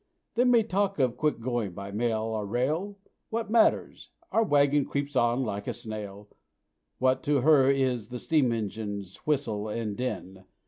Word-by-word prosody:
They 245 +2 +2
may 240 -2 +5
talk 200 -1 0
of 130 -4 +1
quick 150 -6 0
going 115 -5 -2
by 100 +2 -7
mail 110 +1 0
or 110 -1 -2
by - - -10
rail 155 - -1 0.3
What 225 -1 -3
matters? 230 -1 +2 0.2
our 225 - +3
wagon 145 -5 +3
creeps 140 +1 -3
on 120 +1 +2
like 100 -3 -4
a - - -1
snail; 105 -2 -7 0.7
What 130 0 +2
to 145 -2 +2
'her' 140 -2 +5
is 130 -5 +1
the 125 - -6
steam 140 -2 +2
engine's 100 -3 -4
whistle 110 -8 0
and 105 -1 -3
din? 95 -6 -5
125 Hz, 170 wpm, -28 LUFS, 110-145 Hz, 0.7 s, may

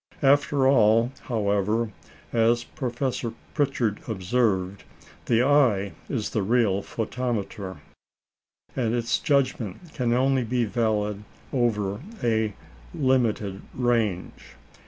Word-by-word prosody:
After 140 0 +4
all, 115 -2 +4
however, 105 0 0 0.4
as 120 +1 +3
Professor 125 -4 -3 0.2
Pritchard 130 -8 0
observed, 100 -2 0 0.4
"the 120 +1 +3
eye 125 -9 +3 0.2
is 115 -7 -2
the 110 - 0
real 105 -2 +2
photometer," 110 -4 -3 1.0
and 120 -3 0
its 115 -1 0
judgment 140 - -1
can 125 -4 0
only 130 +1 +2
be 120 +1 0
valid 105 -2 -1 0.3
over 105 -5 0 0.2
a 110 -3 +1 0.4
limited 115 -7 +1
range. 115 -7 -1
115 Hz, 95 wpm, -25 LUFS, 105-125 Hz, 1.0 s, After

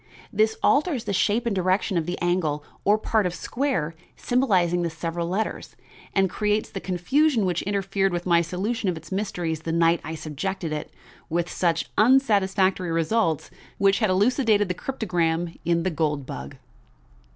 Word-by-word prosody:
This 220 +1 +2
alters 290 -5 +2
the - - -3
shape 215 +5 +1
and 230 -4 0
direction 185 +2 +1
of 165 -1 0
the 175 - -2
angle 165 -4 0 0.2
or 205 +1 +4
part 215 -2 +1
of 175 - -4
square 225 - -2 0.2
symbolizing 185 -9 +2
the 170 - 0
several 165 +1 -3
letters, 200 +5 -3 0.4
and 195 -1 +4
creates 210 +3 -1
the 195 - -4
confusion 230 - +1
which 175 -2 0
interfered 195 -1 0
with 175 0 -3
my 170 -2 +4
solution 190 +5 -2
of 175 - -2
its 160 0 -12
mysteries 180 -5 -2
the 160 +1 -4
night 165 0 +3
I 160 +2 -5
subjected 155 +2 -4
it, 150 - -5 0.4
with 170 +1 -1
such 170 -2 0
unsatisfactory 195 -7 +3
results, 165 -1 +1
to - - -16
the - - -23
tests - - -23
which 195 0 +3
had 215 -4 +2
elucidated 210 +1 +2
the - - +1
cryptogram 175 -7 -1
in 170 0 +2
The 185 - 0
Gold 150 -3 -1
Bug. 70 - -7
185 Hz, 175 wpm, -25 LUFS, 170-210 Hz, 0.4 s, or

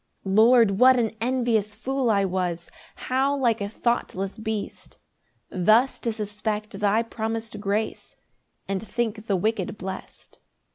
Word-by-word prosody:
9 190 - -2
Lord, 230 -1 +6
what 255 0 +7
an 230 -3 +1
envious 235 -4 0
fool 260 +2 -1
I 200 -2 +3
was! 180 -2 -2 0.3
How 270 +2 0
like 235 -5 +1
a 200 - -2
thoughtless 215 -3 -2
beast! 220 -1 -5 0.5
Thus 215 +8 +3
to 230 - -1
suspect 210 -1 -4
thy 210 +2 +2
promis'd 225 -1 -4
grace, 210 +2 -2 0.5
And 195 -1 -2
think 225 -1 -3
the 200 - +2
wicked 210 +1 -1
blest. 190 0 -9
220 Hz, 135 wpm, -25 LUFS, 200-235 Hz, 0.5 s, what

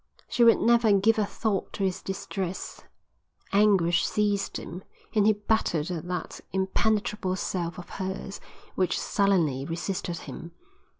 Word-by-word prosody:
She 240 - +2
would 230 -1 +7
never 235 -2 +4
give 215 +3 +4
a 205 - +1
thought 205 -3 -2
to 200 - -3
his 190 -2 -1
distress. 190 -1 -4 0.7
Anguish 195 -5 +4
seized 205 -1 0
him 180 +3 -8 0.3
and 210 -1 +4
he 215 - +6
battered 205 -6 0
at 175 0 -4
that 180 -2 -4
impenetrable 195 0 0
self 175 -2 -3
of 180 - -8
hers 190 +1 -5 0.3
which 185 -1 +1
sullenly 170 -10 +1
resisted 170 +2 -3
him. 170 0 -9
190 Hz, 135 wpm, -27 LUFS, 175-210 Hz, 0.7 s, would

